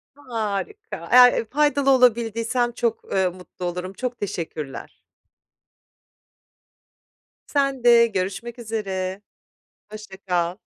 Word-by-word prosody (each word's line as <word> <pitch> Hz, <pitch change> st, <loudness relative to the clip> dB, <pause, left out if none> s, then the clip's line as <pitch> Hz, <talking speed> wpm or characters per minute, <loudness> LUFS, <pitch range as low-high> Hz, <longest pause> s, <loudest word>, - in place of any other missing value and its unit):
Harika, 255 Hz, -, -5 dB
eğer, 250 Hz, 0 st, +8 dB
eee, 230 Hz, -, -1 dB
faydalı 285 Hz, +1 st, +1 dB
olabildiysem 240 Hz, -1 st, +2 dB
çok, 230 Hz, -1 st, -2 dB
eee, 190 Hz, -1 st, +2 dB
mutlu 180 Hz, 0 st, -9 dB
olurum, 180 Hz, +2 st, -4 dB
çok 245 Hz, +3 st, -5 dB
teşekkürler. 160 Hz, -8 st, -6 dB, 2.5 s
Sen 275 Hz, -3 st, 0 dB
de 235 Hz, -1 st, +6 dB
görüşmek 210 Hz, +5 st, -4 dB
üzere, 195 Hz, -4 st, -4 dB, 0.7 s
hoşça 210 Hz, -3 st, -10 dB
kal. 180 Hz, -1 st, -1 dB
225 Hz, 95 wpm, -23 LUFS, 190-250 Hz, 2.5 s, eğer